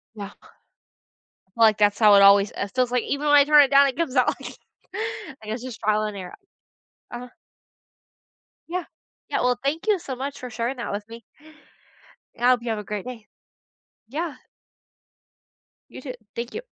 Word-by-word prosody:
Yeah. 205 -1 -7 1.2
I - - -38
feel 230 +2 +1
like 215 -1 +4
that's 205 0 +2
how 210 -2 +7
it 200 - +7
always 200 0 +6
it 200 -1 -4
feels 250 -1 +1
like 250 -1 +1
even 285 +1 -3
when 290 - +5
I 285 - +8
turn 295 0 +7
it 275 - -1
down, 280 0 +6
it 265 - -4
comes 305 -6 -2
out 255 - +4
like - - -4 0.3
like, 340 - -6
it's 240 +1 -6
just 255 -3 -8
trial 215 0 +1
and 210 -1 -4
error. 180 -2 -8 0.8
Uh-huh. 245 +1 -7 1.4
Yeah. 355 0 -3 0.4
Yeah, - - 0
well, 250 0 +1
thank 310 +9 -2
you 410 -4 +3
so 270 -6 -6
much 275 +2 -5
for 250 -2 -7
sharing 235 +3 -3
that 240 - -4
with 205 +1 -5
me. 230 +1 -11 1.2
I 245 +1 +3
hope 250 -2 +3
you 235 - -5
have 220 -1 -1
a - - -6
great 210 0 -5
day. 235 -4 -8 0.8
Yeah. 305 +2 -4 1.5
You - - -10
too. 255 -2 -6 0.2
Thank 235 +1 -5
you 450 - -5
245 Hz, 185 wpm, -24 LUFS, 215-280 Hz, 1.5 s, I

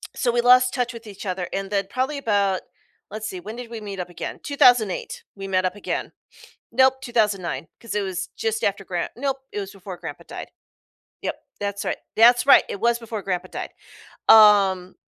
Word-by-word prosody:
So, 245 - +1
we 240 0 +2
lost 250 +1 +5
touch 250 -1 -1
with 230 -1 -10
each 200 0 -9
other 185 -2 -3
and 195 0 -3
then 200 -1 0
probably 260 +5 -1
about, 200 -7 +1 0.5
let's 215 +1 -5
see, 185 - -6
when 215 +5 -8
did 245 -1 -8
we 230 -1 -6
meet 200 -2 -7
up 180 - -4
again? 175 - -6
2008, 245 -8 +3
we 195 -1 -7
met 185 -1 +1
up 185 +1 -1
again. 205 - -4 0.6
Nope, 260 +2 +5
2009, 200 - -1
'cause 230 - -6
it 210 - +1
was 185 -2 -4
just 220 -1 -1
after 200 0 -1
Gran 175 -2 -2
nope, 270 +1 -1
it 205 - -3
was 195 -1 -6
before 190 -1 -9
Grandpa - - -8
died. - - -8 0.7
Yep, - - -2 0.2
that's 200 0 -3
right. - - -1 0.2
That's 240 +3 +6
right, - - +8
it 200 - -5
was 235 +2 +2
before 225 -2 -6
Grandpa 185 -2 -3
died. - - -5 0.6
Um, 200 -4 +6
210 Hz, 195 wpm, -23 LUFS, 190-235 Hz, 0.7 s, right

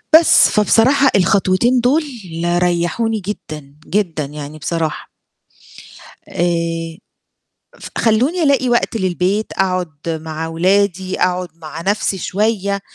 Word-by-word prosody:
بس. 325 +1 +6
فبصراحة 255 +6 +3
الخطوتين 195 +5 +2
دُول 265 +7 +2 0.4
ريحوني 175 +6 0
جدًا، 155 -8 -7
جدًا 175 -7 -1
يعني 150 +1 -8
بصراحة. 160 +1 -3 1.2
آآ 165 -1 -2 0.8
ف - - -8
خلّوني 255 +11 +2
ألاقي 280 -4 +2
وقت 240 -1 +1
للبيت، 190 +2 -1
أقعد 185 -2 -1 0.2
مع 160 0 -4
ولادي، 185 +2 0
أقعد 180 0 0
مع 160 -1 -9
نفسي 195 +1 -1
شوية، 200 +1 -1
185 Hz, 100 wpm, -17 LUFS, 165-220 Hz, 1.2 s, بس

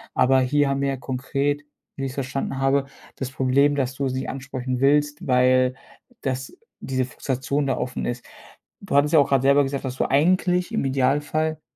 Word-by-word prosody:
Aber 130 +1 +4
hier 145 +2 +2
haben 135 0 -1
wir 140 - +1
ja 135 - -2
konkret, 135 +2 -2 0.4
wie 135 - -3
ich's 130 0 -5
verstanden 135 0 -3
habe, 135 +1 +2 0.3
das 130 - -4
Problem, 135 +3 +2
dass 130 -2 -1
du 135 +1 -2
sie 130 +1 -3
ansprechen 130 -2 -4
willst, 145 +2 +2
weil 125 0 +3 0.5
das 130 - -4 0.2
diese 130 -1 -1
Frustration 135 +2 -2
da 130 -2 0
offen 125 0 -3
ist. 120 0 -4 0.6
Du 195 -8 -4
hattest 145 +2 +3
ja 160 - +7
auch 140 - +3
gerade 135 -2 +2
selber 140 +1 +5
gesagt, 135 0 -3
dass 130 0 -4
du - - 0
eigentlich 180 - +2
im 220 - 0
Idealfall, 145 +4 0
135 Hz, 185 wpm, -23 LUFS, 130-145 Hz, 0.6 s, ja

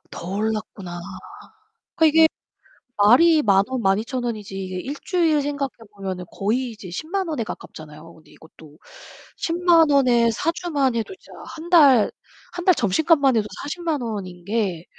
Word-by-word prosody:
더 170 - -8
올랐구나. 200 -3 -4 1.0
그러니까 320 -2 +4
이게 320 +1 +5 0.7
말이 300 +10 +5
10,000 195 -4 +3
원, 260 -2 -3
12,000 220 +6 0
원이지 215 -5 -5
이게 185 -1 -5
1 280 +9 -5
주일 330 -5 +1
생각해 285 -1 -2 0.3
보면은 190 -2 -5
거의 235 +5 -1
이제 210 -4 -11
100,000 340 - -3
원에 300 -8 -2
가깝잖아요. 155 -4 -10
근데 160 - -21
이것도 155 -1 -17 0.6
100,000 335 -2 +3
원에 250 -5 +3
4 295 +9 -1
주만 285 -8 -1
해도 230 - -3
진짜 - - -19 0.2
1 330 +1 -9
달 280 - +6 0.4
1 355 0 -6
달 370 - +6
점심값만 275 - +2
해도 210 -1 0 0.2
400,000 320 -1 -3
원인 190 -6 -6
게 200 -5 -2
240 Hz, 250 characters per minute, -22 LUFS, 195-315 Hz, 1.0 s, 달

